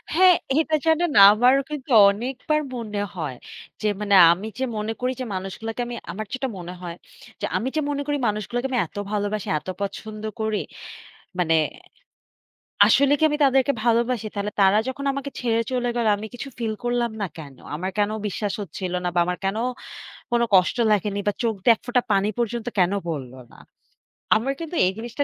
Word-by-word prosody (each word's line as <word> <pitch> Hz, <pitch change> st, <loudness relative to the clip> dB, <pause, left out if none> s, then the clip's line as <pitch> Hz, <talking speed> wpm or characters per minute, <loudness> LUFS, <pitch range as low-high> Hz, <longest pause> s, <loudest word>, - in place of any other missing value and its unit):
হ্যাঁ, 365 Hz, +1 st, +7 dB, 0.2 s
এটা 315 Hz, 0 st, +1 dB
জানেন 325 Hz, +1 st, +2 dB, 0.2 s
আমার 245 Hz, +5 st, +4 dB
কিন্তু 295 Hz, -2 st, -6 dB, 0.2 s
অনেকবার 255 Hz, +8 st, -1 dB
মনে 210 Hz, -4 st, -4 dB
হয় 150 Hz, -7 st, -4 dB, 0.5 s
যে, 215 Hz, -, 0 dB
মানে 205 Hz, -1 st, +2 dB, 0.2 s
আমি 185 Hz, +5 st, -2 dB
যে, -, -, 0 dB
মনে 215 Hz, +1 st, -2 dB
করি 250 Hz, +1 st, +1 dB
যে, -, -, -2 dB
মানুষগুলোকে 220 Hz, +5 st, -5 dB
আমি 240 Hz, -, -5 dB, 0.2 s
আমার 215 Hz, +3 st, -5 dB
যেটা 265 Hz, +1 st, -2 dB
মনে 175 Hz, 0 st, -7 dB
হয় 170 Hz, -2 st, -6 dB, 0.5 s
যে, -, -, 0 dB
আমি 240 Hz, -, -2 dB
যে, 310 Hz, -, +1 dB
মনে 285 Hz, 0 st, -1 dB
করি 290 Hz, 0 st, 0 dB
"মানুষগুলোকে 215 Hz, +5 st, -2 dB
আমি 250 Hz, -, +1 dB
এত -, -, -15 dB
ভালোবাসি, 205 Hz, -1 st, -2 dB
এত -, -, -21 dB
পছন্দ 215 Hz, +2 st, -5 dB, 0.2 s
করি 220 Hz, -1 st, 0 dB, 0.8 s
মানে 165 Hz, -2 st, +3 dB, 1.3 s
আসলে 280 Hz, +1 st, +4 dB
কি -, -, -6 dB
আমি 295 Hz, -, -1 dB
তাদেরকে 270 Hz, 0 st, +3 dB
ভালোবাসি? 235 Hz, -1 st, +1 dB
তাহলে 205 Hz, 0 st, -3 dB
তারা 195 Hz, +1 st, +5 dB
যখন 270 Hz, +2 st, -5 dB
আমাকে 275 Hz, +1 st, -5 dB
ছেড়ে 230 Hz, -2 st, +1 dB
চলে 245 Hz, -1 st, 0 dB
গেল 235 Hz, -2 st, 0 dB
আমি 210 Hz, +2 st, -6 dB
কিছু 245 Hz, +3 st, -6 dB
feel 225 Hz, -2 st, -1 dB
করলাম 240 Hz, -1 st, 0 dB
না -, -, 0 dB
কেন? 140 Hz, -4 st, -10 dB, 0.2 s
আমার 185 Hz, +5 st, -3 dB
কেন 205 Hz, 0 st, +2 dB, 0.2 s
বিশ্বাস 205 Hz, 0 st, -2 dB
হচ্ছিল 185 Hz, -2 st, -5 dB
না -, -, +1 dB
বা -, -, +1 dB
আমার 180 Hz, -1 st, -2 dB
কেন 195 Hz, +2 st, 0 dB, 0.7 s
কোন 240 Hz, 0 st, +2 dB
কষ্ট 185 Hz, +2 st, +4 dB, 0.2 s
লাগেনি 205 Hz, 0 st, 0 dB
বা -, -, +2 dB
চোখ 230 Hz, -2 st, +1 dB
দিয়ে 230 Hz, +3 st, +6 dB
এক -, -, -16 dB
ফোঁটা 245 Hz, 0 st, +2 dB
পানি 200 Hz, +1 st, +2 dB
পর্যন্ত 235 Hz, 0 st, -2 dB
কেন 180 Hz, 0 st, +3 dB, 0.2 s
পড়লো 130 Hz, -5 st, -5 dB
না?" -, -, -17 dB, 0.8 s
আমার 245 Hz, +6 st, 0 dB
কিন্তু 330 Hz, +1 st, -6 dB
এই 185 Hz, -, +2 dB
জিনিসটা 240 Hz, +5 st, -3 dB
225 Hz, 185 wpm, -23 LUFS, 200-255 Hz, 1.3 s, হ্যাঁ